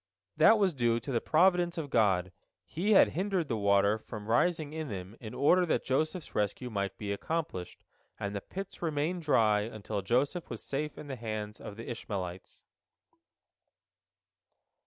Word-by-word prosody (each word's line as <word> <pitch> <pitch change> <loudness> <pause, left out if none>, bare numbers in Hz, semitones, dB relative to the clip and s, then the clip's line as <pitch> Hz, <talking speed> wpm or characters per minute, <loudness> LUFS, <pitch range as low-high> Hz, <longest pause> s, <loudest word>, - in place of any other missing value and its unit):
That 160 +9 +6
was 195 -4 +2
due 120 -3 +1
to 135 - -6
the 115 - +1
providence 175 +1 +3
of 145 -5 -4
God; 95 -5 +2 0.3
He 195 - 0
had - - +7
hindered 185 -2 -1
the 115 - 0
water 100 +1 +3
from 110 -1 -8
rising 150 +6 +1
in 160 -1 -4
them 95 0 -6
in 110 0 -8
order 180 +6 +4
that - - 0
Joseph's 155 +6 -1
rescue 105 +4 -1
might 100 -2 -2
be 105 -2 -4
accomplished, 100 - -4 0.4
and 100 -1 -3
the 100 - -3
pits 195 - -8
remained 165 +2 -1
dry 110 -9 +3
until 105 -1 -4
Joseph 135 - 0
was 115 - -6
safe 150 +2 -3
in - - -8
the 140 -2 -5
hands 110 -2 -5
of 100 - -8
the 115 - -8
Ishmaelites. 95 -6 -6
120 Hz, 160 wpm, -31 LUFS, 105-160 Hz, 0.4 s, had